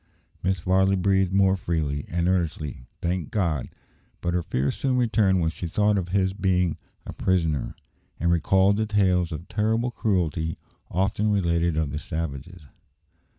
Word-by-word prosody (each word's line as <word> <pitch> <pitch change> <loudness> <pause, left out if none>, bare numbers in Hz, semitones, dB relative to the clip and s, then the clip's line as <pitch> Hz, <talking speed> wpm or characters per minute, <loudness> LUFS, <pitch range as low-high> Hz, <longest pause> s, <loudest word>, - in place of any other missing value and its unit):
Mrs. 95 -1 0
Varley 95 +1 +3
breathed 95 0 +2
more 95 0 +4
freely, 80 -6 -2
and 85 +1 0
earnestly 80 -8 -2 0.2
thanked 90 -1 -1
God; 85 - -1 0.5
but 85 0 -2
her 90 - +1
fears 70 -4 -1
soon 130 -2 0
returned 110 -6 +2
when 80 -1 +1
she 85 - -5
thought 105 +4 +2
of 90 -3 -2
his 95 0 +1
being 90 -4 +1 0.3
a - - -7
prisoner, 80 -7 0 0.4
and 85 +2 +2
recalled 95 +4 +3
the 110 0 0
tales 95 -4 +2
of 80 +2 -6
terrible 110 +5 0
cruelty 85 -8 -1 0.3
often 100 +4 0
related 85 -4 +1
of 80 -3 0
the 75 - -3
savages. 80 +2 -5
90 Hz, 150 wpm, -25 LUFS, 80-95 Hz, 0.5 s, more